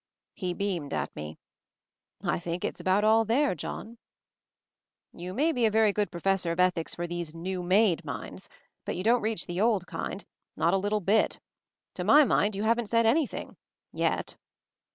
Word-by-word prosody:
He 180 -1 -3
beamed 180 -8 -2
at - - -3
me. 75 +1 -7 0.9
"I - - 0
think 175 0 -4
it's - - -4
about 190 +2 +2
all 220 +1 +5
there, 250 +5 +2
John." 225 +7 -7 1.1
"You 180 +1 -7
may 310 +6 +2
be 250 -6 -1
a - - +2
very 215 -1 +3
good 210 0 0
Professor 185 0 0
of 170 - -4
Ethics 180 -2 +1
for 175 - -3
these 170 -2 -5
new 180 +2 -4
made 185 -1 +3
minds, - - -7 0.3
but - - -3
you 180 - -4
don't 235 +3 +3
reach 215 -4 -2
the 175 +2 -3
old 215 -5 +2
kind 200 - -5 0.2
— - - -58
not 170 +2 +2
a - - +4
little 205 +2 0
bit. 205 +4 +2 0.5
To - - -4
my 300 - +7
mind 210 -4 +2
you 200 - -2
haven't 230 +1 +1
said 230 0 +3
anything 270 +6 0 0.2
— - - -64
yet." - - -1
200 Hz, 185 wpm, -28 LUFS, 175-225 Hz, 1.1 s, my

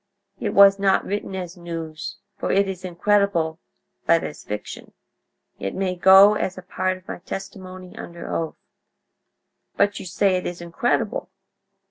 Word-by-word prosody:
It - - -2
was 200 0 +8
not 195 -1 +3
written 200 -1 -3
as 180 -1 -5
news, 165 -3 -6 0.2
for - - -2
it 195 0 +3
is 190 -1 -5
incredible, 180 -3 +1 0.5
but 165 0 +4
as - - -7
fiction. 105 0 -7 0.7
It 95 - -4
may 190 -1 -1
go 190 +3 +8
as 190 -3 -2
a 185 - -8
part 185 0 -1
of 185 - -21
my - - -6
testimony 185 0 -8
under 170 0 -8
oath." 160 -1 -2 1.2
"But 205 0 +2
you - - -7
say 185 +1 +2
it 180 - -3
is 175 - -5
incredible." 205 - -1
185 Hz, 150 wpm, -23 LUFS, 170-195 Hz, 1.2 s, was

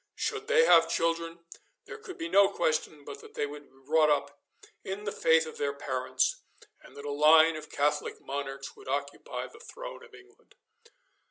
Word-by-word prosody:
Should 430 0 -3
they 480 0 +5
have - - +6
children, 165 0 -1 0.4
there - - -9
could 395 -4 -10
be 330 -2 -4
no 200 -10 +5
question 155 -5 -1
but 145 - -8
that - - -15
they - - 0
would 145 0 -10
be 135 - -26
brought 155 +1 +4
up 145 -1 -1 0.4
in 195 +2 -5
the 205 - -3
faith 160 -3 +3
of 155 - -9
their 140 -1 0
parents, 140 - -1 0.4
and 305 - -17
that 140 - -9
a 145 - -3
line 155 +2 +6
of 155 0 -8
Catholic 150 +1 -1
monarchs 135 0 -6
would - - -15
occupy 140 +1 -4
the - - -14
throne - - -9
of 460 -3 -15
England. 400 +1 -20
155 Hz, 185 wpm, -29 LUFS, 145-235 Hz, 0.4 s, have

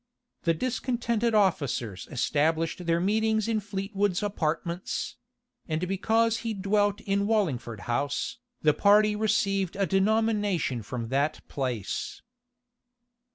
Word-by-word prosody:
The 165 -1 +3
discontented 235 0 0
officers 140 - 0
established 160 +6 0
their 165 0 +3
meetings 220 +3 +1
in 225 -1 +1
Fleetwood's 200 -1 -1
apartments; 170 -2 -2 0.5
and 160 +2 -1
because 225 +4 +2
he 225 -1 -3
dwelt 205 +1 +1
in 200 0 0
Wallingford 140 - 0
House, 140 - -2 0.2
the 150 -1 +5
party 210 +5 +4
received 200 -3 +1
a 195 0 +1
denomination 200 - +1
from 115 +1 -5
that 140 +4 -1
place. 125 -8 -3
195 Hz, 110 wpm, -27 LUFS, 155-215 Hz, 0.5 s, the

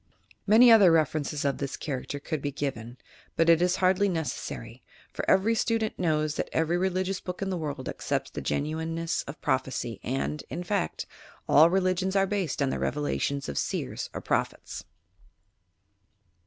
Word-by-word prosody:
Many 230 +4 +8
other 205 -6 +8
references 150 -2 +1
of 140 -2 0
this 140 -1 -4
character 145 -1 -4
could 155 0 -4
be 145 - -2
given, 125 -4 -4 0.4
but 165 0 +3
it 165 0 +6
is 180 0 +3
hardly 190 +2 +3
necessary, 160 - -4 0.3
for - - -4
every 195 +4 +4
student 225 -1 0
knows 155 -3 0
that - - -2
every 160 +1 +1
religious 185 +1 0
book 180 -1 -6
in 195 -1 -2
the 185 - -1
world 145 -5 -4
accepts - - -3
the - - -5
genuineness 160 +2 -2
of 140 +1 -8
prophecy 130 -4 -1
and, 135 +4 -2
in 175 - -4
fact, 185 0 -2 0.4
all 155 +3 +7
religions 185 +1 +1
are 195 0 +4
based 190 -8 -1
on 135 - 0
the - - -2
revelations 140 0 -1
of 70 - -2
seers - - -3
or - - -6
prophets! - - -2
165 Hz, 160 wpm, -27 LUFS, 145-185 Hz, 0.4 s, Many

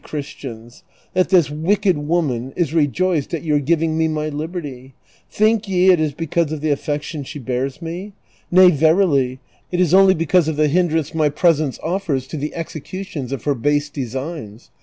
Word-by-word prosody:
Christians, 125 -6 -8 0.3
that 185 -1 +2
this 175 -6 +4
wicked 185 +5 +1
woman 145 -5 -1
is 165 -4 -1
rejoiced 165 +1 +1
at 160 - -6
your 150 -3 +2
giving 160 +2 0
me 160 - +3
my 155 -1 -2
liberty? 145 -4 -6 0.3
Think 215 0 +1
ye 185 0 +4
it 180 - +3
is 155 -2 0
l)ecause 165 0 -1
of 155 -2 -4
the 155 -1 0
affection 145 +1 -3
she 135 - -8
bears 130 +3 -3
me? 180 +5 -6 0.4
Nay 180 0 +7
verily, 150 -5 +2 0.3
it 180 - -1
is 180 -2 +2
only 190 0 +6
because 165 +1 +2
of 160 - -1
the 150 0 +2
hindrance 160 -2 +1
my 155 -2 +2
presence 155 -2 +1
offers 165 -6 -1
to 155 - -5
the 150 +1 -4
execution 165 -3 -6
of 135 -5 -4
her 145 - +1
base 145 +4 0
designs. 130 -3 -6
155 Hz, 175 wpm, -20 LUFS, 140-175 Hz, 0.4 s, Nay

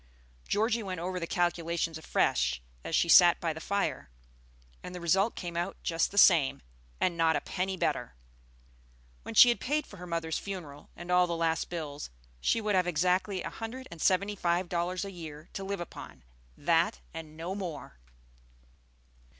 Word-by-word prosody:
Georgie 225 +2 +1
went 185 -4 -4
over 180 +2 -3
the 170 - -4
calculations 170 -2 0
afresh 65 - +1 0.2
as 165 - -2
she 170 - +3
sat 175 0 +7
by 165 -2 -1
the 160 - -8
fire, 200 - -2 0.7
and 180 - -8
the - - -5
result 190 +6 +2
came 175 -2 -6
out 175 +1 -2
just 165 -1 +1
the 200 - -10
same, 160 - +5 0.4
and 175 - +1
not 165 -1 +3
a - - 0
penny 190 +1 -3
better. - - -1 1.1
When - - -8
she 245 - +10
had 235 - +1
paid 300 +3 -1
for 200 - -13
her 180 0 -9
mother's 165 -1 -2
funeral, 175 -8 -8
and 175 +1 -7
all 180 0 +5
the 170 - -2
last 165 -1 0
bills, 150 -4 -5 0.3
she 230 - +2
would 215 -1 -1
have 185 -2 +3
exactly 180 +3 +1
a - - -5
hundred 250 +3 -7
and 165 -2 -9
seventy 200 +2 +2
five 175 -1 0
dollars 180 +2 -1
a 200 - -6
year 155 -3 -9
to 195 - -5
live 200 0 -3
upon, 175 - -9 0.3
that 65 - +2
and 155 -1 -9
no 170 +3 -4
more! 180 - -6
175 Hz, 175 wpm, -30 LUFS, 165-195 Hz, 1.1 s, she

